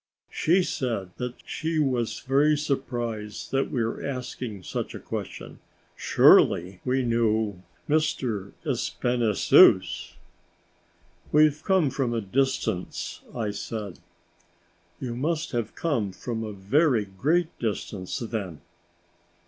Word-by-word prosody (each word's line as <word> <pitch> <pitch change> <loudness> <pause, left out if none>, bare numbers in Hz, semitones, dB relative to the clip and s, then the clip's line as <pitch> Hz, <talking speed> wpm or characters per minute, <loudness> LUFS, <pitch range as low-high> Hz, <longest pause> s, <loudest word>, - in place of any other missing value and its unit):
She 180 +4 +3
said 115 - -2
that 125 0 -4
she 160 0 -2
was 130 -6 0
very 145 +3 +3
surprised 120 -7 -3
that 135 0 +1
we 120 - 0 0.2
asked 130 -3 -5 0.2
such - - -4
a - - -6
question; - - -6 0.4
surely, 90 +2 +4
we 130 +1 +1
knew 110 -4 +1 0.3
Monsieur 125 -10 0
Espinassous! 120 -4 +3 1.2
"We've 150 0 +4
come 185 -8 +3
from 125 -3 -1
a 115 - 0
distance," 120 -4 -1
I 110 -4 -1
said. 105 -3 -6 1.0
"You 120 -2 -4
must 160 +5 -1
have 115 -3 -3
come 120 - -1
from 115 +1 -4
a 110 - -4
very 110 - +2
great 150 - +1
distance, 105 -4 -3
then?" 110 - -4
120 Hz, 110 wpm, -26 LUFS, 105-140 Hz, 1.2 s, surely